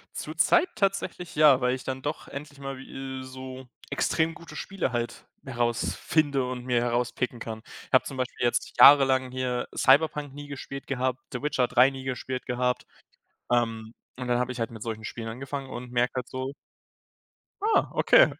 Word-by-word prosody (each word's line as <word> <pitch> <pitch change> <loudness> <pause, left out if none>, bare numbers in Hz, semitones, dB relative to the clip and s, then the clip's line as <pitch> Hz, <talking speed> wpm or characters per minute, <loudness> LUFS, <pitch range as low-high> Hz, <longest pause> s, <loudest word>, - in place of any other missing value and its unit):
Zurzeit 345 +1 +2
tatsächlich 195 -3 -1
ja, 145 -4 +7
weil 125 +1 +2
ich 130 - -7
dann 130 0 -4
doch 150 +2 -4
endlich 145 0 -8
mal 135 0 -5
wie 130 - -11
äh, 130 -1 -5
so 130 0 -8 0.2
extrem 165 0 +1
gute 170 - -11
Spiele 190 -9 -2
halt 120 -1 -3 0.2
herausfinde 130 +3 0
und 125 -1 -5
mir 120 -2 +2
herauspicken 120 0 -1
kann. 110 -1 -6 0.3
Habe 130 - +6
zum 135 - -6
Beispiel 125 -1 -2
jetzt 120 - +1
jahrelang 135 -2 +7
hier 125 -1 -1
Cyberpunk 145 0 +3
nie 145 0 -8
gespielt 140 0 -7
gehabt, 130 -1 -1
The 125 - -4
Witcher 135 -4 +1
3 125 +3 +5
nie 135 -1 -8
gespielt 130 0 -4
gehabt, 125 0 0 0.7
ähm, 115 -2 0 0.3
und 125 - -4
dann 120 0 +2
habe 125 +1 0
ich 125 - -7
halt 115 - -1
mit 110 -2 -9
solchen 110 -1 -5
Spielen 115 +1 -5
angefangen 135 +3 -5
und 120 0 -7
merke 125 0 +2
halt 125 -1 -3
so 130 +1 -4 1.1
„Ah, 435 +1 +3
okay.“ - - +6
130 Hz, 175 wpm, -27 LUFS, 125-140 Hz, 1.1 s, ja